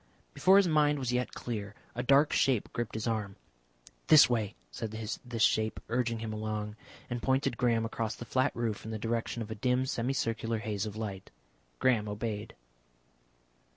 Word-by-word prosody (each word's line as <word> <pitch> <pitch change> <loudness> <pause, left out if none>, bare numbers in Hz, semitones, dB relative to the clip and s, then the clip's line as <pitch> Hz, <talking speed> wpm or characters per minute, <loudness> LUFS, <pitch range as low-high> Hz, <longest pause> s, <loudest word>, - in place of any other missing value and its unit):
Before 190 +1 +5
his 200 -2 +5
mind 150 -2 +3
was 125 -3 -2
yet 125 0 -1
clear 105 -3 -5 0.2
a 120 - -2
dark 140 +4 +4
shape 130 -6 +2
gripped 120 -2 -3
his 110 - -3
arm. 105 -4 -2 0.7
"This 155 -2 +9
way," 110 -5 -1 0.2
said 110 - -4
this 110 +2 -3
shape, 110 0 +2
urging 120 -1 0
him 110 -1 -4
along, 105 -1 -3 0.3
and 120 -1 -4
pointed 130 -1 +1
Graham 115 -2 +2
across 115 -1 -3
the 120 - -8
flat 130 +3 +1
roof 115 -3 -2
in 110 - -7
the 110 - -3
direction 115 +1 -2
of 110 - -9
a - - -1
dim 125 +3 +1
semicircular 115 -3 -1
haze 105 -2 -2
of 105 - -7
light. 100 -3 -5 0.5
Graham 110 - +2
obeyed. 105 +1 -4
115 Hz, 170 wpm, -31 LUFS, 110-125 Hz, 0.7 s, This